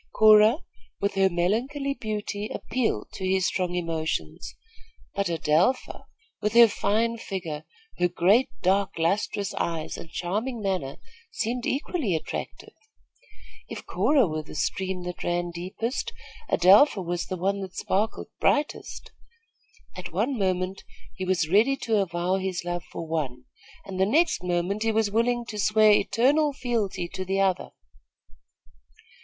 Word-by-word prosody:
Cora, 215 +8 +6 0.4
with 200 - 0
her 195 0 +3
melancholy 240 +11 0
beauty, 210 -3 -4
appealed 255 -3 -2
to 190 - -7
his 190 -1 +2
strong 180 -2 -1
emotions; 165 -2 -3 0.6
but 200 0 -1
Adelpha, 165 - +1 0.4
with 210 +1 0
her 235 0 +9
fine 225 +2 0
figure, 165 -8 -5 0.3
her 180 - +4
great, 190 +8 +3
dark, 195 +1 +1
lustrous 195 +3 0
eyes 165 -2 -3
and 165 - -9
charming 215 +9 -3
manner, 185 -10 -2 0.3
seemed 240 - -2
equally 270 - -1
attractive. 160 - -6 1.0
If - - -7
Cora 285 -5 +3
were 155 -3 -3
the 155 - -12
stream 190 +3 -2
that 180 0 -6
ran 175 0 -1
deepest, 185 +9 -4 0.4
Adelpha 195 +3 +5
was 175 0 -3
the 185 - -4
one 195 +3 0
that 190 -1 -7
sparkled 210 +4 -1
brightest. 295 0 -1 0.8
At 185 -1 -7
one 220 - 0
moment 185 -2 -1 0.3
he 185 - -5
was 180 -3 +1
ready 215 +10 +4
to 225 -4 0
avow 180 0 0
his 190 -2 -3
love 175 -1 -3
for 165 - -7
one, 135 -6 -3 0.4
and 190 -1 -6
the 190 - +3
next 315 - +2
moment 180 +3 -1
he 225 0 +2
was 220 -2 +1
willing 240 +2 +1
to 210 - -5
swear 215 +1 +5
eternal 280 +8 +3
fealty 230 -9 -2
to 190 - -5
the 190 +1 -1
other. 190 -2 +1
195 Hz, 140 wpm, -26 LUFS, 175-225 Hz, 1.0 s, her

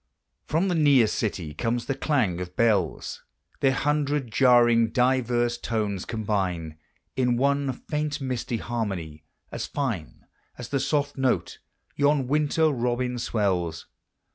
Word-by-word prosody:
From 165 +6 +1
the 180 - +1
near 145 -7 +5
city 95 -8 -2
comes 115 +6 -2
the 135 - -1
clang 120 - 0
of 90 0 -7
bells: 110 -5 0 0.4
Their 135 -2 +3
hundred 145 -2 0
jarring 120 -2 +5
diverse 120 -1 +1
tones 105 -6 -2
combine 95 -8 -2 0.4
In 125 -2 +1
one 140 +1 +1
faint 150 +3 -3
misty 125 -3 -3
harmony, 95 -10 -4 0.3
as - - -4
fine 115 - -4 0.3
As - - -7
the 140 - 0
soft 145 +1 -1
note 130 -1 0 0.4
yon 145 -2 +2
winter 150 +2 +2
robin 125 -1 -1
swells. 90 -8 -1
120 Hz, 125 wpm, -26 LUFS, 105-140 Hz, 0.4 s, near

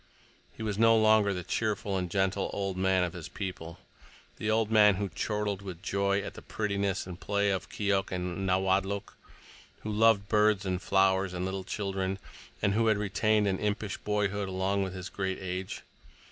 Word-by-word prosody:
He - - -5
was 105 -1 -2
no 115 0 +6
longer 110 -2 +4
the 90 -2 -3
cheerful 105 -2 -1
and 90 -2 -1
gentle 95 +1 0
"old 95 -2 -2
man" 95 0 +2
of 90 -1 -2
his 85 -4 -7
people; 90 -4 -6 0.6
the 110 - -2
old 110 0 +2
man 105 -2 +6
who 100 +1 -2
chortled 105 +2 -2
with 95 -2 -8
joy 100 0 +1
at - - -6
the - - -10
prettiness 100 -3 -2
and 90 -1 -8
play 100 0 +1
of 95 - -3
Keok 100 -2 0
and 90 +1 -3
Nawadlook, 95 +2 0 0.7
who 110 - -4
loved 105 -1 +4
birds 105 -2 +3
and 90 -1 -1
flowers 95 -1 +2
and 90 +1 -2
little 95 0 -3
children, 95 -1 -2 0.5
and 100 -1 +3
who 115 +2 +2
had 110 -2 +4
retained 105 +1 +1
an 95 -1 0
impish 105 -1 -2
boyhood 100 -1 -1
along 95 +1 0
with 95 -1 -3
his 90 0 -6
great 95 0 -3
age. 95 0 -5
100 Hz, 180 wpm, -29 LUFS, 95-105 Hz, 0.7 s, no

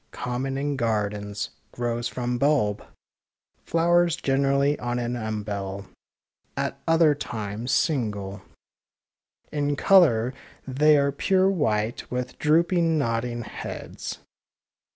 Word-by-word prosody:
Common 125 +2 -3
in 140 0 -1
gardens 105 -3 -2
— - - -41
grows 120 -1 -2
from 125 0 -3
bulb. 130 -8 +2 0.8
Flowers 170 0 +3
generally 140 +1 +1
on 120 0 -2
an 120 0 -2
umbel 100 -3 -4 0.4
— - - -68 0.3
at - - -2
other 165 -2 +5
times 110 -3 -4
single 105 - 0 0.6
— - - -69 0.3
in 145 -1 0
colour 140 -10 +4 0.3
they 150 +3 +4
are 140 0 +2
pure 190 +6 +2
white, 115 - -1
with 125 0 -4
drooping 165 +1 +3
nodding 120 -2 -1
heads. - - -7
125 Hz, 110 wpm, -25 LUFS, 110-150 Hz, 0.8 s, other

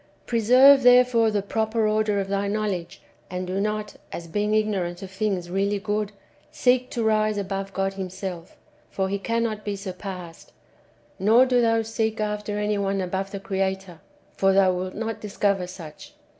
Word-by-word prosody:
Preserve 255 +4 +6
therefore 245 -2 +5
the 205 -2 -1
proper 220 +1 0
order 215 -1 +1
of 195 - -2
thy 200 +1 -1
knowledge, 200 -4 -3 0.3
and 180 0 -4
do 185 +2 -2
not, 210 0 -3
as 170 - -6
being 210 +5 0
ignorant 195 -5 -1
of 190 - -8
things 190 -3 -2
really 200 +2 0
good, 210 0 -2 0.4
seek 250 0 +2
to 235 - -2
rise 215 -1 +2
above 195 0 -3
God 195 0 -1
Himself, 185 -2 -6 0.3
for 190 -1 -2
He 200 +1 -2
cannot 230 0 -1
be 205 -1 -3
surpassed; 185 -3 -8 0.7
nor 225 +6 +5
do 250 -1 +3
thou 225 -1 +2
seek 220 0 -2
after 210 -1 -2
any 210 0 0
one 195 0 0
above 190 +1 -2
the 200 0 -6
Creator, 190 -3 -3 0.3
for 195 0 +2
thou 190 -1 +4
wilt 185 +1 -4
not 225 +1 -4
discover 200 -3 0
such. 165 -4 -11
200 Hz, 165 wpm, -24 LUFS, 190-215 Hz, 0.7 s, Preserve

